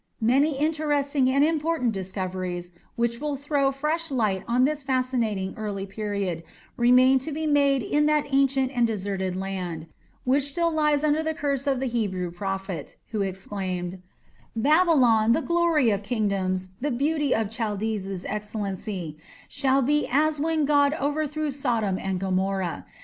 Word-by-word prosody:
Many 270 +5 +3
interesting 290 -3 +1
and 275 +2 +3
important 310 -5 +1
discoveries, 185 -2 -4 0.2
which 235 -1 0
will 300 -1 -1
throw 280 0 +1
fresh 310 +4 -1
light 215 -8 0
on 245 +2 +3
this 300 +1 -1
fascinating 250 -7 -1
early 205 -3 -4
period, 200 -4 -3 0.3
remain 255 +2 +5
to 310 +5 -6
be 315 +2 -3
made 280 -3 +3
in 295 0 +2
that 300 -1 +2
ancient 270 -1 +2
and 240 -1 +3
deserted 195 -3 -2
land, 185 -4 -4 0.4
which 265 +2 +2
still 335 +4 +1
lies 300 -2 +2
under 305 +1 +2
the 315 0 -2
curse 280 -2 -1
of 270 -2 +1
the 265 - -1
Hebrew 200 -8 -2
prophet, 195 0 -5
who 215 -3 -1
exclaimed: 185 -2 -4 0.5
"Babylon, 250 -5 +4
the 320 - +1
glory 335 -8 +3
of 200 -1 0
kingdoms, 195 -4 -1
the 290 - -1
beauty 290 +2 +1
of 220 -2 -1
the - - -11
Chaldees' 210 -4 -3
excellency, 200 -5 -4 0.3
shall 270 -1 +1
be 295 +3 +1
as 300 +2 +2
when 315 0 +1
God 285 0 +3
overthrew 300 +1 -1
Sodom 235 -8 -1
and 190 -1 -2
Gomorrah. 190 - -1
245 Hz, 150 wpm, -25 LUFS, 195-290 Hz, 0.5 s, remain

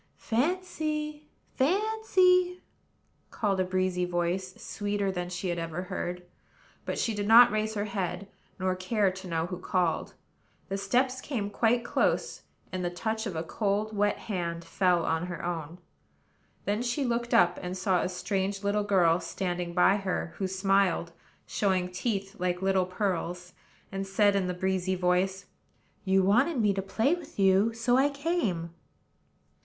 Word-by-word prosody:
"Fancy! 305 +2 -2 0.3
Fancy!" 365 +1 +2 0.7
called 200 -4 -1
a - - +3
breezy 185 -1 0
voice, 180 +1 -1
sweeter 205 -1 -2
than 180 -1 -3
any - - -8
she 180 +1 -3
had 175 0 -1
ever 165 +1 -4
heard. 180 -1 -4 0.6
But - - -3
she 230 - 0
did 205 -1 -2
not 235 +2 +8
raise 215 +1 -1
her 205 0 -1
head, 195 -2 -3 0.3
nor 185 -1 0
care 195 +1 +1
to 190 0 -9
know 165 -1 -1
who 180 0 -6
called. 180 -2 -1 0.5
The 195 - -1
steps 255 +4 +1
came 210 -8 -3
quite 235 +2 +2
close; - - 0 0.3
and 185 -1 -3
the 175 - 0
touch 220 +5 -3
of 190 - -5
a 160 - -2
cold, 210 +4 -1
wet 205 0 +2
hand 170 -6 -4
fell 180 -2 +2
on 165 +2 0
her 175 -2 -5
own. 165 -1 -4 0.9
Then 205 +3 0
she 250 +3 -1
looked 235 0 -1
up, 175 0 +4
and 180 +1 -4
saw 185 -1 +1
a - - -1
strange 195 +2 -2
little 205 +1 +1
girl 180 -4 +3
standing 180 -2 -3
by 190 +2 +5
her, 190 -3 -3
who 190 - -1
smiled, 190 -2 +1 0.3
showing 185 -3 0
teeth 195 +1 -3
like 180 0 -1
little 190 -1 +2
pearls, 180 -2 -3 0.4
and 195 0 -4
said, 200 +1 +3
in 190 -2 +1
the 180 - -2
breezy 190 0 0
voice: 185 +1 +1 0.6
"You 190 0 +3
wanted 245 - +3
me 210 -3 +3
to 195 - -2
play 225 - +1
with 350 - -7
you, 195 +3 +4
so 240 +2 +2
I 275 +2 +4
came." 280 - -2
195 Hz, 160 wpm, -28 LUFS, 180-220 Hz, 0.9 s, not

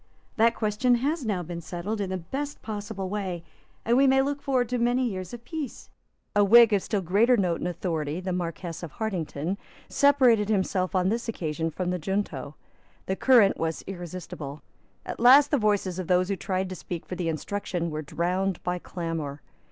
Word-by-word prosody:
That 230 +1 +4
question 220 +3 +2
has 285 +5 -1
now 200 -6 -1
been 170 0 -6
settled 185 +6 -4
in 195 - -2
the 185 - -2
best 275 - -5
possible 205 -2 -4
way; 185 -4 -3 0.4
and 235 - +3
we 270 +2 +5
may 265 0 +5
look 285 +1 -2
forward 255 -3 +1
to 250 -1 -1
many 245 +2 +2
years 185 -4 -5
of 240 0 -9
peace." 310 -6 -6 0.4
A 205 - +5
Whig 230 +2 +7
of 200 - +3
still 205 0 -1
greater 220 +8 +4
note 180 -5 +1
and - - -2
authority, 165 -3 -2
the 185 0 -3
Marquess 170 -1 -4
of 170 -4 -7
Hartington, 180 -4 -3 0.3
separated 255 -7 +4
himself 190 -2 0
on 185 0 +3
this 230 +2 -2
occasion 165 -5 -2
from 180 +3 -3
the 180 - -2
junto. 155 -6 -3 0.5
The 190 - -1
current 235 -4 +5
was 165 0 -2
irresistible. 170 -6 -7 0.4
At - - -6
last 270 +5 +7
the 290 - +3
voices 200 -4 +1
of 180 - -4
those 180 +1 +2
who 200 - +1
tried 190 0 -2
to 185 - -5
speak 175 -1 -6
for - - -7
the 175 -2 -2
Instruction 170 0 -3
were 155 0 -3
drowned 180 +4 -1
by 180 0 -1
clamour. 165 -6 -5
190 Hz, 190 wpm, -27 LUFS, 175-230 Hz, 0.5 s, Whig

